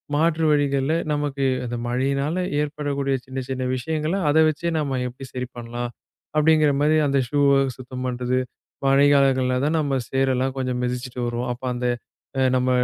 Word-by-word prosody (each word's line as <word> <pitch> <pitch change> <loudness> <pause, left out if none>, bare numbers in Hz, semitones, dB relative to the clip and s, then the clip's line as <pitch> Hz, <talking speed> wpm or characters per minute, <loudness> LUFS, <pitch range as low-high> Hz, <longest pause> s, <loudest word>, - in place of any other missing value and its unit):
மாற்று 160 +1 +2
வழிகள்ல, 140 0 +2 0.2
நமக்கு 145 -2 -1 0.2
அந்த 120 0 -4
மழையினால 140 +6 0 0.2
ஏற்படக்கூடிய 145 -2 -1
சின்ன 130 0 -5
சின்ன 130 -1 -2
விஷயங்கள, 155 +6 -2
அத 145 - +2
வெச்சே 155 +2 -1
நம்ம 140 -3 -1
எப்டி 130 +2 -9
சரி 125 0 -3
பண்ணலாம்? 120 +1 -5 0.5
அப்டிங்கிற 155 -1 +4
மாதிரி, 155 +1 +4
அந்த 140 0 +2
ஷூ 145 - 0 0.4
சுத்தம் 130 0 -7
பண்றது. 125 0 0 0.5
மழை 135 +1 +5
காலங்கள்ல 130 -2 +3
தான் 155 +2 +1
நம்ம 140 -3 0
சேரு 135 0 +1
எல்லாம் 130 +1 -1
கொஞ்சம் 130 -1 -1
மிதிச்சுட்டு 125 0 -3
வருவோம். 120 +1 -2
அப்போ 125 +2 -9
அந்த 125 0 -1 0.7
நம்ம 130 0 +1
135 Hz, 155 wpm, -23 LUFS, 125-145 Hz, 0.7 s, மழை